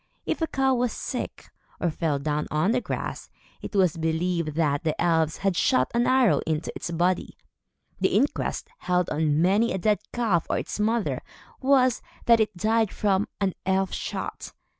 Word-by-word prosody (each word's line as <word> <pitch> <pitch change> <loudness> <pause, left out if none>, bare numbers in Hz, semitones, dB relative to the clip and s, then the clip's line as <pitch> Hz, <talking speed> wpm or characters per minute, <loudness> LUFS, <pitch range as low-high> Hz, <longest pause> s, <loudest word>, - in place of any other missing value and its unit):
If - - -2
a 325 - +1
cow 270 -2 +1
was 245 -1 +1
sick, - - -5 0.3
or 175 - 0
fell 155 -1 -1
down 150 +1 -2
on 155 +7 +1
the 250 +1 +1
grass, - - -5 0.3
it - - -7
was 185 -5 +3
believed 160 -1 -1
that 150 -3 +1
the 155 -2 -1
elves 160 -2 +2
had 195 -2 0
shot 130 -5 +2
an 240 0 +2
arrow 255 -4 +4
into 155 0 -1
its - - -5
body. 175 +2 0 0.6
The - - +2
inquest, 290 - 0
held 180 -1 0
on 155 0 +2
many 205 +6 +3
a - - -1
dead 210 +2 +2
calf 210 -9 +1
or - - +1
its - - -4
mother, 225 +1 0 0.4
was, 260 -2 +3 0.2
that 230 -1 +6
it 210 -3 0
died 220 +1 +2
from 200 -1 +1
an 195 -3 +1
"elf 190 0 +1
shot." - - -5
185 Hz, 175 wpm, -26 LUFS, 160-225 Hz, 0.6 s, that